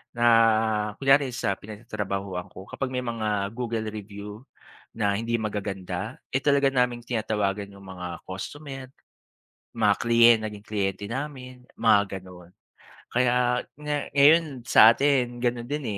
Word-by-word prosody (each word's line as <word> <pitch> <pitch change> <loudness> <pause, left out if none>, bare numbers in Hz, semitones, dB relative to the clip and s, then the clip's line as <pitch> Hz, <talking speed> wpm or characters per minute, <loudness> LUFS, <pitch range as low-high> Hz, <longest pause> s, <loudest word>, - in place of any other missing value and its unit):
na, 110 -2 +3
kunyari 135 0 +4
sa 100 -5 -1
pinagtatrabahuan 100 -4 -5
ko, 95 - -11
kapag 135 - -3
may 125 0 -2
mga 105 -4 -1
Google 115 -3 -3
review 105 +1 -9 0.5
na 100 -3 +1
hindi 115 +3 -1
magaganda 100 0 -4
eh, 135 - +2
talaga 140 -1 +3
naming 125 -2 +1
tinatawagan 105 -4 -2
yung 100 0 -14
mga 90 -2 -6
customer, 135 +8 -7 0.9
mga - - +4
kliyen 115 0 +6
naging 105 -1 -7
kliyente 100 -1 -2
namin, 130 -1 -6
mga 105 -3 +4 0.2
ganon. 90 -1 -14 0.6
Kaya 125 0 +2 0.2
nga 150 0 -2 0.2
ngayon 145 -2 +4
sa 115 -1 +8
atin, 130 -3 +1
ganun 120 -1 -1
din 145 +1 -4
115 Hz, 130 wpm, -26 LUFS, 100-125 Hz, 0.9 s, sa